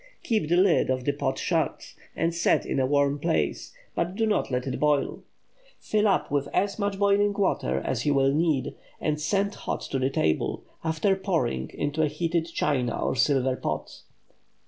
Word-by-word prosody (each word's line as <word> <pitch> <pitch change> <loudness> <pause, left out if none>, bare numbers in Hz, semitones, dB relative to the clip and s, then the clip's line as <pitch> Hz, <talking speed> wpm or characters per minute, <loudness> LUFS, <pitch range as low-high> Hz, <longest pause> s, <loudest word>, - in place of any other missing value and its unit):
Keep 215 - 0
the 175 - +3
lid 185 -6 +4
of 130 -1 0
the 145 - +3
pot 140 -2 -2
shut, - - -1 0.2
and 165 +1 0
set 170 - +2
in - - -1
a 130 - +2
warm 140 0 +2
place, 165 +2 -1 0.2
but 175 +2 -2
do 225 - +1
not 215 -2 +1
let 125 -1 -1
it 130 - -3
boil. 150 -2 +1 0.6
Fill 215 0 +1
up 195 -7 +1
with 140 -1 0
as 200 +2 0
much 200 -1 -1
boiling 200 +1 +3
water 70 - 0
as 125 - -2
you 145 -1 +2
will 135 0 +3
need, 150 -4 +1 0.3
and 150 -1 -1
send 200 +5 0
hot - - -4
to 135 - -3
the 130 +1 +1
table, 80 - 0 0.2
after 160 +5 +1
pouring 165 - -1
into 145 +2 -1
a 155 - +3
heated 165 +2 -1
china 125 -7 0
or - - 0
silver 130 -1 +2
pot. - - -4
150 Hz, 185 wpm, -26 LUFS, 135-190 Hz, 0.6 s, lid